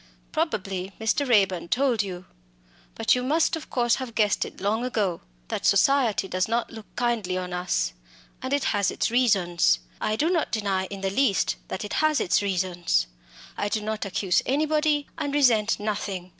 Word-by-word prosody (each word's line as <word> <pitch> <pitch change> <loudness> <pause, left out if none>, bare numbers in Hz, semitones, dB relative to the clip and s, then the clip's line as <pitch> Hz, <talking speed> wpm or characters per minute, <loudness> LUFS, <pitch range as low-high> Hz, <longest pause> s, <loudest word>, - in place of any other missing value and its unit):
"Probably 195 - -2
Mr. 240 +5 0
Raeburn 195 -7 +3
told 245 +1 +2
you 185 -3 -6 0.7
but - - +3
you 250 - +1
must 315 +6 +2
of 320 - -8
course 240 -2 +2
have 255 -4 -6
guessed 210 -3 +2
it - - -11
long 210 +4 0
ago 210 -8 -1 0.3
that - - -3
society 235 -1 +3
does 185 0 0
not 230 +1 -1
look 220 -2 -10
kindly 230 -7 0
on 180 -1 -4
us 180 - -1 0.5
and 260 - -4
has 215 -9 +1
its - - -1
reasons. 190 - +3 0.2
I 215 - 0
do 315 +9 +1
not 335 -4 0
deny 200 -4 0
in 195 0 -8
the 195 0 -1
least 225 -2 +2
that 205 - -4
it 205 - -6
has 310 -1 +3
its 180 - +2
reasons. 180 - 0 0.5
I 205 - -2
do 215 - 0
not 215 -1 -3
accuse 190 -1 +1
anybody, 300 +1 +1
and 285 0 -2
resent 230 -7 +3
nothing. 200 -3 -3
215 Hz, 170 wpm, -25 LUFS, 190-255 Hz, 0.7 s, Raeburn